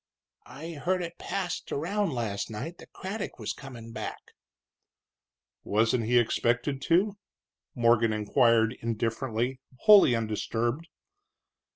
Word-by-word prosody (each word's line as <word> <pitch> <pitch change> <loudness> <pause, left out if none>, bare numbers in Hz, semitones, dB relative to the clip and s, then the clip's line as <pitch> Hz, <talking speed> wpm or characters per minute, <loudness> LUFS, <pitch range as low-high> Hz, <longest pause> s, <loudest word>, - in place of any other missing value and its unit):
"I 160 +4 -8
heard 180 +4 -1
it 170 0 -7
passed 185 -3 -3
around 200 +7 0
late 120 -5 -2
last 100 -1 -3
night 135 +11 -6
that - - -14
Craddock 200 +3 -5
was - - -3
comin' 120 -4 -10
back." - - -5 1.5
"Wasn't 115 +2 +1
he 120 +2 +3
expected 120 +3 +1
to?" 195 +4 +2 0.6
Morgan 115 -2 +4
inquired, 115 +1 +3
indifferently, 115 +2 -2 0.2
wholly 205 - +7
undisturbed. 115 +6 -2
125 Hz, 110 wpm, -28 LUFS, 115-170 Hz, 1.5 s, wholly